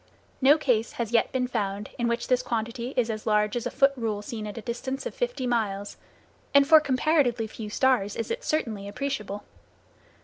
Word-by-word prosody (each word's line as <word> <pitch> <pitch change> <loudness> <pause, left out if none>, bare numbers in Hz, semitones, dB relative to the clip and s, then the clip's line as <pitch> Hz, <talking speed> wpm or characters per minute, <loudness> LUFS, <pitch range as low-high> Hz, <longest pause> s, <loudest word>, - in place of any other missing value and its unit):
No 280 +4 +7
case 240 -7 +1
has 235 -2 -3
yet 235 - +3
been 255 -1 0
found 205 -4 -3
in 235 - +1
which 235 0 -1
this 255 -1 +3
quantity 235 +1 -3
is 235 -2 +2
as 215 0 -6
large 210 0 +2
as 240 0 -1
a - - -2
foot 275 +2 +3
rule 220 -4 -2
seen 215 -1 -5
at 205 - -7
a - - -4
distance 260 +4 -4
of - - -4
fifty 485 - -2
miles, 205 -5 -1 0.6
and 280 0 +7
for 315 0 +9
comparatively 270 -4 +2
few 220 0 -7
stars 210 -4 +2
is 230 - -3
it 480 +2 -3
certainly 220 - -2
appreciable. 210 -3 -4
235 Hz, 195 wpm, -26 LUFS, 215-265 Hz, 0.6 s, for